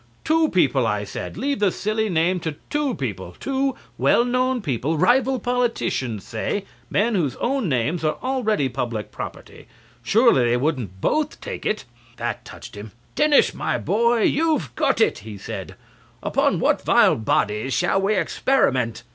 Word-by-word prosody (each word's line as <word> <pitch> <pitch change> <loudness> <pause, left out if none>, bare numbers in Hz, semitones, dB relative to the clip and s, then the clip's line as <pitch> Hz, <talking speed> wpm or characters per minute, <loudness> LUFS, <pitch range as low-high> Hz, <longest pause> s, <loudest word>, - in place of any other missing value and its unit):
"Two 320 0 +3
people," 135 -9 +2
I 105 -1 -1
said; 95 -3 -6
"leave 275 +4 -1
the 205 -3 +3
same - - -9 0.2
silly 220 -1 +1
name 175 +1 +1
to 160 -3 -4 0.2
two 295 -3 0
people, - - -5
two 270 -1 -1 0.2
well 235 - +4
known 255 +1 +1
people, 140 +4 -1
rival 255 - +3
politicians, 230 - -1
say, 190 - -3 0.2
men 230 +3 +1
whose 150 - 0
own 260 -6 -1
names 140 +6 0
are 155 -1 0
already 230 - +1
public 120 -4 -4
property. - - -9 0.3
Surely 220 - +4
they 120 +1 +2
wouldn't 125 - -2
both 305 -1 0
take - - -5
it." 210 - -2 0.3
That 120 0 -3
touched 120 - -11
him. 105 0 -9 0.2
"Denis, 300 -1 +4
my - - -1
boy, 235 +1 +2
you've 305 - +1
got - - +1
it," - - +2
he 105 0 -9
said. - - -7 0.5
"Upon - - +1
what - - +2
vile - - +5
bodies 110 +2 0
shall 180 +2 +2
we 205 +2 +1
experiment?" 130 - +1
185 Hz, 160 wpm, -22 LUFS, -, 0.5 s, vile